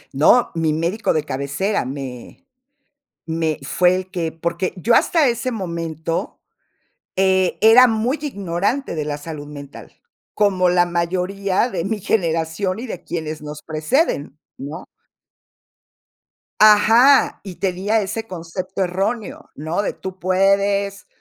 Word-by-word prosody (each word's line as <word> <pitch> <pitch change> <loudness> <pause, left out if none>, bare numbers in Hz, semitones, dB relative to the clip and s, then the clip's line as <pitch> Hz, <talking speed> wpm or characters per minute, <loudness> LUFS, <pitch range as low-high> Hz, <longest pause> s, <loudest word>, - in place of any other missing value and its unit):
No. 200 - +4
Mi 160 -2 0
médico 170 +8 0
de 155 -2 0
cabecera 140 +7 -2
me 135 - -8 0.8
me 160 -1 -1
fue 180 +5 +3
el 185 0 -5
que 165 -4 -2
porque 170 +2 -2
yo 220 +6 +1
hasta 320 -6 +3
ese 235 +2 -2
momento, 165 -5 -4 0.8
eh, 190 -1 +2
era 235 +3 +8
muy 230 +6 0
ignorante 200 - -2
de 150 -1 -2
la 145 -1 -3
salud 145 -1 -8
mental, 145 -1 -11 0.4
como 190 -3 +2
la 175 0 +4
mayoría 185 +5 -1
de 185 -4 -3
mi 215 0 -2
generación 170 +1 -1
y 250 - -6
de 185 - -7
quienes 155 -2 -5
nos 150 0 -8
preceden, 155 - -1 0.2
¿no? 150 +6 -7 1.8
¡Ajá!, 225 +6 +6
y 190 -3 -8
tenia 195 +4 0
ese 215 +3 -4
concepto 185 +2 -4
erróneo, 195 +5 -3
¿no?, 160 +6 -2
de: - - -2
"Tú 190 0 -8
puedes, 200 +2 +1
185 Hz, 125 wpm, -20 LUFS, 160-205 Hz, 1.8 s, era